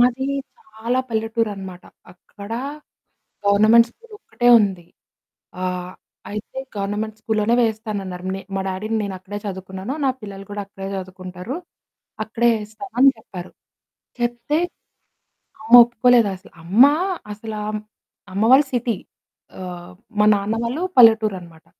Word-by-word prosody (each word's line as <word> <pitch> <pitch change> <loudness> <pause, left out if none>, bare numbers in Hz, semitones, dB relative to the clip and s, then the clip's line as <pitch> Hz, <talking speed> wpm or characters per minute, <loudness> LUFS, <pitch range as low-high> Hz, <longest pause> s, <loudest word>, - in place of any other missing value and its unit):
మాది 250 +2 +3 0.3
చాలా 250 - -2
పల్లెటూరనమాట. 220 -5 -3 0.3
అక్కడ 200 +3 -13 1.0
గవర్నమెంట్ 215 +3 +6
స్కూల్ 460 - -21
ఒక్కటే 415 - 0
ఉంది. 190 -4 -1 0.8
ఆహ్, 180 0 -3 0.4
అయితే 210 +4 -7 0.2
గవర్నమెంట్ 210 +2 -3
స్కూల్‌లోనే 220 +1 +1
వేస్తానన్నారు. 205 -5 -3
నే 195 - -6
మా 195 - 0
డ్యాడీ‌ 190 +3 -3 0.2
నేనక్కడే 190 +1 -6
చదువుకున్నాను. 190 +3 -5
నా - - +4
పిల్లలు 195 -2 -8
కూడా 205 0 -3
అక్కడే 195 -1 -8
చదువుకుంటారు 185 +4 -7 0.7
అక్కడే 225 +2 0
ఏస్తామని 240 +5 +2
జెప్పారు. 185 -5 -9 0.7
చెప్తే, 240 +4 -1 1.0
అమ్మ 225 +2 -3
ఒప్పుకోలేదసలు. 230 -5 +2
అమ్మ 195 +9 +6 0.5
అసలా 215 0 -6 0.2
మ్ - - -7 0.5
అమ్మ 200 +3 0
వాళ్ళు 275 +2 +7
సిటీ. 240 -3 0 0.6
ఆహ్, 180 -1 -8 0.3
మా 210 - +5
నాన్న 200 +2 -1
వాళ్ళు 255 +9 -2 0.2
పల్లెటూరనమాట. 210 -8 +4
210 Hz, 110 wpm, -21 LUFS, 190-235 Hz, 1.0 s, వాళ్ళు